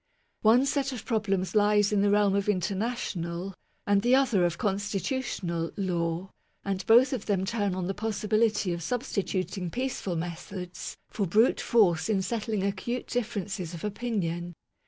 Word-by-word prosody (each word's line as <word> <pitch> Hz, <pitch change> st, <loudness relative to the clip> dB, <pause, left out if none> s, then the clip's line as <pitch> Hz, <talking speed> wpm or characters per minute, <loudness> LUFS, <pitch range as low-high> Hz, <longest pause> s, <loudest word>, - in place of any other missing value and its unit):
One 235 Hz, +5 st, +5 dB
set 275 Hz, -1 st, 0 dB
of 240 Hz, -3 st, -7 dB
problems 200 Hz, -5 st, 0 dB
lies 210 Hz, -1 st, +4 dB
in 200 Hz, -, +3 dB
the 205 Hz, -, +3 dB
realm 205 Hz, -1 st, +4 dB
of 200 Hz, +1 st, 0 dB
inter 190 Hz, 0 st, +1 dB
national, 190 Hz, -4 st, -3 dB, 0.3 s
and 200 Hz, 0 st, +3 dB
the 245 Hz, +3 st, +4 dB
other 250 Hz, -9 st, +3 dB
of 175 Hz, -1 st, -1 dB
constitutional, 200 Hz, -, -2 dB
law; 175 Hz, -1 st, -1 dB, 0.3 s
and 195 Hz, -1 st, -2 dB
both 245 Hz, +4 st, +6 dB
of 240 Hz, -5 st, -4 dB
them 195 Hz, -3 st, +1 dB
turn 205 Hz, -3 st, -1 dB
on 185 Hz, -1 st, -2 dB
the 195 Hz, -, -1 dB
possibility 215 Hz, -1 st, +1 dB
of 170 Hz, -, -4 dB
substituting^ 190 Hz, -, -2 dB
peaceful 245 Hz, -6 st, -2 dB
methods 175 Hz, +2 st, -6 dB
for 200 Hz, -3 st, -1 dB
brute 215 Hz, +8 st, +3 dB
force 190 Hz, -6 st, +3 dB
in 195 Hz, -3 st, +2 dB
settling 215 Hz, -1 st, -2 dB
acute 200 Hz, +5 st, -2 dB
differences 205 Hz, -7 st, -3 dB
of 165 Hz, -, -9 dB
opinion. 185 Hz, -6 st, -2 dB
200 Hz, 155 wpm, -28 LUFS, 185-225 Hz, 0.3 s, both